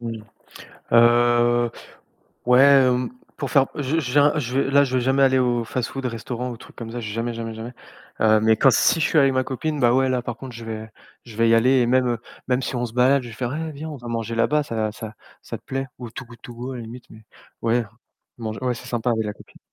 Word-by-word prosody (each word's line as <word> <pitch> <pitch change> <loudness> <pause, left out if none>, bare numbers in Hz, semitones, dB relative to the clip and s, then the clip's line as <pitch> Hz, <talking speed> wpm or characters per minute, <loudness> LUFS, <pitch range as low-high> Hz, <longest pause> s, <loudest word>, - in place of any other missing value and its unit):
Mmh, 115 -2 -6 0.7
heu, 120 0 +4 0.8
ouais, 125 +1 +6 0.2
heu, 125 0 +1 0.3
pour - - -4
faire 135 -3 +4
je 145 +3 0
je 125 -5 -4
viens 145 +1 +5
je 130 -2 -2
vais 135 - +1
là 140 0 +6
je 130 -2 0
vais - - +2
jamais 135 +2 +2
aller 130 -1 +4
au 120 -2 +1
fast-food, 130 +3 -4
restaurant 125 +1 -4
ou 120 - -7
truc - - -15
comme 115 -1 -8
ça, 120 - -5
jamais 115 +1 -3
jamais 115 -1 -5
jamais, 115 +2 -7 0.5
heu, 110 0 +4
mais 110 0 +3
quand 135 +4 +5
si 165 - +3
je 155 - +3
suis 160 - +2
avec 135 -2 +5
ma 130 0 +1
copine, 150 +4 -3
bah, 120 -2 +3
ouais 130 0 +3
là 130 -1 0
par 120 -1 -6
contre 130 0 -9
je 115 - -9
vais 110 0 -6 0.3
je 115 -3 -12
vais 115 0 +3
y 115 - +5
aller 125 +4 +4
et - - +1
même 125 -1 +2 0.3
même 125 0 +2
si - - -4
on 120 0 -1
se 115 - -11
balade, 130 +3 +3
je 120 - -9
vais 115 - -10
faire: 125 +3 -3
«Hé, 160 +1 -4
viens 150 +2 -7
on 150 - -6
va 120 -1 -9
manger 115 -1 -3
là-bas. 150 +6 +2
Ça 110 -5 -2
ça 110 0 -8 0.3
ça - - -7
te - - -32
plaît?» 135 0 -3
ou 120 -2 -8
Too 125 - -8
Good 120 0 -15
To 120 - -10
Go 125 +3 -6
à - - -6
la 120 - -6
limite 120 +2 -10
mais, 110 0 -14 0.4
ouais 115 +1 +1 0.5
mang 110 -2 -4
ouais 125 -1 -1
c'est 115 - -10
sympa 120 0 -1
avec 110 -1 0
la 105 - -3
copine. - - -18
120 Hz, 255 wpm, -22 LUFS, 115-130 Hz, 0.8 s, ouais